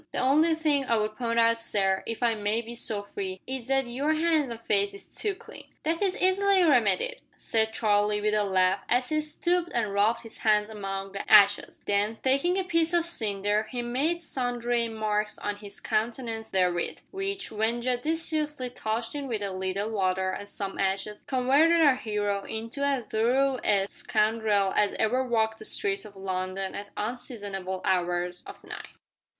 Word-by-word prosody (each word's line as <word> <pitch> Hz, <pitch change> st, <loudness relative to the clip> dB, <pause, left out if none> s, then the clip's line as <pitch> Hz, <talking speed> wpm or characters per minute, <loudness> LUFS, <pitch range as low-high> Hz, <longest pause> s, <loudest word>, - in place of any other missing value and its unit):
The -, -, -5 dB
only 310 Hz, +5 st, +3 dB
think 295 Hz, -4 st, +1 dB
I 230 Hz, -, +3 dB
would 215 Hz, 0 st, -1 dB
point 230 Hz, -1 st, -2 dB
out, 230 Hz, 0 st, +4 dB
sir, 195 Hz, -4 st, +1 dB
if 230 Hz, +1 st, -4 dB
I 235 Hz, -1 st, +3 dB
may 215 Hz, +2 st, -1 dB
be 235 Hz, +1 st, -8 dB
so 215 Hz, -3 st, -2 dB
free, 190 Hz, -2 st, -5 dB
is 260 Hz, -2 st, -5 dB
that 270 Hz, 0 st, +2 dB
your 260 Hz, +5 st, -2 dB
'ands 315 Hz, -3 st, +2 dB
an' 230 Hz, -, -5 dB
face 200 Hz, -3 st, +1 dB
is 200 Hz, -, -10 dB
too 415 Hz, -2 st, -1 dB
clean." -, -, -12 dB, 0.2 s
"That 330 Hz, +3 st, 0 dB
is 385 Hz, -2 st, +1 dB
easily 380 Hz, 0 st, +4 dB
remedied," 265 Hz, -, +2 dB
said 220 Hz, -1 st, +1 dB
Charlie, 210 Hz, -2 st, +2 dB
with 210 Hz, 0 st, 0 dB
a 210 Hz, -1 st, +3 dB
laugh, 190 Hz, -1 st, +2 dB
as 250 Hz, +1 st, +2 dB
he 310 Hz, 0 st, +1 dB
stooped 345 Hz, +3 st, -1 dB
and 215 Hz, -4 st, 0 dB
rubbed 215 Hz, +3 st, +2 dB
his 225 Hz, -1 st, -12 dB
hands 210 Hz, 0 st, +2 dB
among 195 Hz, -2 st, -5 dB
the 200 Hz, -, -6 dB
ashes; 205 Hz, -1 st, +5 dB
then, 205 Hz, +2 st, +1 dB
taking 275 Hz, +8 st, +2 dB
a 385 Hz, -, +1 dB
piece 335 Hz, -2 st, +2 dB
of 340 Hz, -1 st, +3 dB
cinder, 210 Hz, -, +1 dB
he 245 Hz, +1 st, -4 dB
made 280 Hz, +8 st, 0 dB
sundry 245 Hz, -5 st, -1 dB
marks 215 Hz, -1 st, -1 dB
on 205 Hz, 0 st, -4 dB
his 205 Hz, -1 st, -5 dB
countenance 225 Hz, 0 st, -2 dB
therewith, 180 Hz, -3 st, 0 dB
which, 390 Hz, 0 st, -3 dB
when 220 Hz, +2 st, 0 dB
judiciously 300 Hz, +1 st, -1 dB
touched 225 Hz, 0 st, -3 dB
in 285 Hz, -2 st, -4 dB
with 220 Hz, -5 st, -3 dB
a 200 Hz, -, -2 dB
little 190 Hz, +3 st, -2 dB
water 190 Hz, -2 st, 0 dB
and 205 Hz, +2 st, -7 dB
some 200 Hz, -1 st, -5 dB
ashes, 195 Hz, +2 st, -2 dB
converted 280 Hz, +6 st, +4 dB
our 285 Hz, -5 st, +5 dB
hero 205 Hz, -4 st, -2 dB
into 230 Hz, +5 st, -4 dB
as 275 Hz, -4 st, 0 dB
thorough 255 Hz, +5 st, +1 dB
a 200 Hz, -2 st, +3 dB
scoundrel 215 Hz, -2 st, +1 dB
as 205 Hz, -1 st, +2 dB
ever 250 Hz, +4 st, +1 dB
walked 220 Hz, -3 st, 0 dB
the 215 Hz, -, -7 dB
streets 195 Hz, 0 st, -1 dB
of 205 Hz, -1 st, -12 dB
London 190 Hz, 0 st, -3 dB
at 205 Hz, 0 st, -7 dB
unseasonable 205 Hz, -5 st, -4 dB
hours 180 Hz, -1 st, 0 dB
of -, -, -11 dB
night. -, -, -9 dB
225 Hz, 180 wpm, -27 LUFS, 205-265 Hz, 0.2 s, ashes